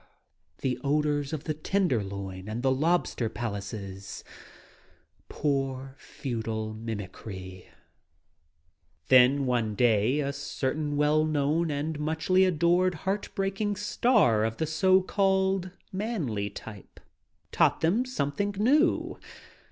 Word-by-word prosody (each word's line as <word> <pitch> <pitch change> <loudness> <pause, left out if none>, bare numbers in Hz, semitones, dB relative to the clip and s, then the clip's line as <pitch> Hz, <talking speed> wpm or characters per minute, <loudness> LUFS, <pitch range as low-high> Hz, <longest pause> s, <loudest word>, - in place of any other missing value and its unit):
The 130 -2 -1
odors 145 0 +1
of 155 -2 -4
the 155 - -2
Tenderloin 100 - -2
and 115 +3 -4
the 135 - +3
lobster 145 -4 +1
palaces. 100 -3 -6 1.1
Poor, 135 -2 -2
futile 110 -6 -4
mimicry! 95 -4 -7
s - - -24 1.4
Then 130 +2 +6
one 120 -4 0
day 115 +4 +3
a 140 -1 -1
certain 145 +1 -2
well 150 +1 +3
known 155 +2 +1
and 150 +1 -2
muchly 160 +5 +2
adored 175 +1 +2
heart 195 +2 -1
breaking 195 +1 -1
star 205 - +3
of 110 0 -1
the 160 - 0
so 185 +4 +3
called 190 -1 +1 0.2
"manly" 170 - -2
type 105 0 -11 0.5
taught - - +3
them 190 +10 +2
something 200 - -2
new. 280 - +2
145 Hz, 110 wpm, -28 LUFS, 115-185 Hz, 1.4 s, Then